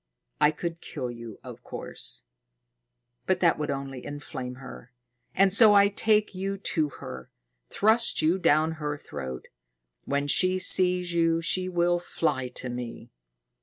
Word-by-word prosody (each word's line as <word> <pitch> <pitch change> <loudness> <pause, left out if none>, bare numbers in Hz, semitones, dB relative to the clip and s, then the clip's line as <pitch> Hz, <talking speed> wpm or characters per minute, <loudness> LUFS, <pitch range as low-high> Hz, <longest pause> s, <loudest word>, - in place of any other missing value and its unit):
I 150 0 +5
could 170 +2 -5
kill 125 -1 -5
you, 115 -3 -10
of - - -10
course; - - -1 1.0
but - - +1
that - - +3
would - - -3
only 135 -2 -5
inflame 135 -3 -7
her. 130 -1 -12 0.4
And 190 0 +4
so 210 0 +7
I 200 0 +6
take 210 +1 +1
you 195 +1 -3
to 160 -6 -1
her, 65 - -10 0.4
thrust 220 +3 +2
you 165 +4 +2
down 155 -2 +3
her 145 -1 -3
throat. 65 - -8 0.6
When 140 0 -1
she 185 +6 +2
sees 180 -1 +4
you, 165 -1 +2
she 185 +2 0
will 175 0 +1
fly 145 -6 -2
to 125 0 -7
me." 120 -1 -7
165 Hz, 145 wpm, -26 LUFS, 135-185 Hz, 1.0 s, so